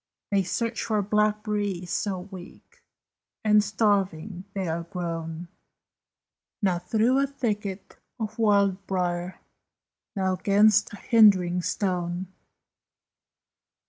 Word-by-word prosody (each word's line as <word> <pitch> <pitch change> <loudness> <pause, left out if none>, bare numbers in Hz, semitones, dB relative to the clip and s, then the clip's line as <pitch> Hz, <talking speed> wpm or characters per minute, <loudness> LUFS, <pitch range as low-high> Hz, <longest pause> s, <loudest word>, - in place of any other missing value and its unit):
They 200 -1 +3
search 230 +5 -2
for 215 -2 0
blackberries, 210 -3 0
so 190 -3 -1
weak 190 - -13 0.6
And 210 -1 +5
starving 195 -3 0
they 190 -2 -2
are 165 +1 -2
grown, 170 -1 -5 1.1
Now 185 -5 +1
through 225 +8 +2
a 275 - +2
thicket 210 -7 -4 0.2
of 220 0 -5
wild 200 -3 +2
brier, 180 -1 -2 0.7
Now 190 -1 0
'gainst 205 +2 +4
a - - -7
hindering 190 -7 +4
stone! 180 -1 -2
195 Hz, 100 wpm, -26 LUFS, 180-210 Hz, 1.1 s, And